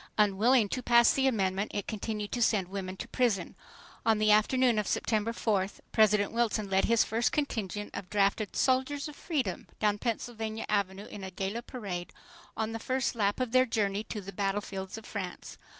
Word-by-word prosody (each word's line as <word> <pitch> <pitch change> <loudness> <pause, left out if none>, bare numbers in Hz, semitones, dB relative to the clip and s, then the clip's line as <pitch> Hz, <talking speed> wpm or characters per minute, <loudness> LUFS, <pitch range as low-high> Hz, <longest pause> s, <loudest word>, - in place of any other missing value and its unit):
Unwilling 210 +3 +4
to 255 - -3
pass 235 -1 +5
the 270 0 +2
amendment, 195 -4 0
it 205 - -2
continued 210 -1 -4
to 245 - -2
send 200 -5 +2
women 190 -1 -5
to - - -6
prison. 235 -7 0 0.5
On 225 -1 +3
the 215 0 +3
afternoon 235 +2 +4
of 210 - -2
September 220 0 0
4th, 205 -4 -1
President 210 -2 +4
Wilson 220 -3 0
led 190 0 +3
his 230 -1 +4
first 230 +3 0
contingent 210 - -2
of 180 - -6
drafted 200 0 +1
"soldiers 265 +3 +1
of 300 - -9
freedom" 295 -5 -2
down 210 -1 +1
Pennsylvania 225 -1 -3
Avenue 200 -1 0
in 205 - -9
gala 200 +4 -2
parade, 200 -9 -6 0.5
on 220 0 -1
the 225 - -4
first 255 +2 -1
lap 205 -2 0
of 255 -2 -1
their 255 +1 +4
journey 205 -2 0
to 210 - -5
the 195 +1 -9
battlefields 195 0 -3
of 220 - -10
France. 185 -4 -6
215 Hz, 180 wpm, -30 LUFS, 200-235 Hz, 0.5 s, pass